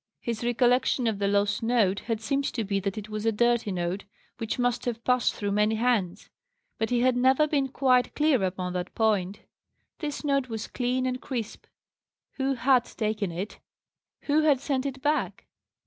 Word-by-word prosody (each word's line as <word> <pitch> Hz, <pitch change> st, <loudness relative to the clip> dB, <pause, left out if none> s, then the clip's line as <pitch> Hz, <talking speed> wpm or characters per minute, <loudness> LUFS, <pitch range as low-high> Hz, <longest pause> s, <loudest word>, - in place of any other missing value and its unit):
His 230 Hz, -1 st, -4 dB
recollection 245 Hz, +1 st, +2 dB
of 220 Hz, -3 st, 0 dB
the 200 Hz, -, +1 dB
lost 205 Hz, +1 st, +1 dB
note 225 Hz, -5 st, +2 dB
had 225 Hz, -2 st, -3 dB
seemed 275 Hz, +5 st, 0 dB
to 230 Hz, -, -1 dB
be 200 Hz, -1 st, -1 dB
that 195 Hz, +1 st, -3 dB
it 215 Hz, 0 st, -5 dB
was 215 Hz, 0 st, -4 dB
a 225 Hz, -, +2 dB
dirty 235 Hz, 0 st, +1 dB
note, 180 Hz, +2 st, -2 dB, 0.4 s
which 225 Hz, +1 st, -3 dB
must 245 Hz, -1 st, 0 dB
have 235 Hz, -1 st, -3 dB
passed 250 Hz, -1 st, +2 dB
through 205 Hz, -1 st, -2 dB
many 210 Hz, +2 st, +2 dB
hands; 220 Hz, -6 st, 0 dB, 0.5 s
but 220 Hz, -, 0 dB
he 245 Hz, -1 st, +1 dB
had 255 Hz, 0 st, +3 dB
never 260 Hz, +4 st, +4 dB
been 280 Hz, -3 st, +1 dB
quite 255 Hz, -2 st, +2 dB
clear 300 Hz, -6 st, +3 dB
upon 185 Hz, -1 st, -2 dB
that 180 Hz, 0 st, -4 dB
point. 205 Hz, -3 st, +1 dB, 0.6 s
This 300 Hz, -2 st, -4 dB
note 275 Hz, -3 st, +1 dB
was 220 Hz, -1 st, -4 dB
clean 255 Hz, +1 st, -1 dB
and 255 Hz, 0 st, -2 dB
crisp. 235 Hz, -5 st, -5 dB, 0.7 s
Who 270 Hz, 0 st, 0 dB
had 250 Hz, 0 st, +3 dB
taken 215 Hz, -4 st, -2 dB
it? 185 Hz, +5 st, -6 dB, 0.6 s
Who 295 Hz, +1 st, +2 dB
had 295 Hz, -4 st, +4 dB
sent 275 Hz, 0 st, -1 dB
it 270 Hz, -1 st, -7 dB
back? 300 Hz, +1 st, -1 dB
235 Hz, 180 wpm, -27 LUFS, 210-255 Hz, 0.7 s, never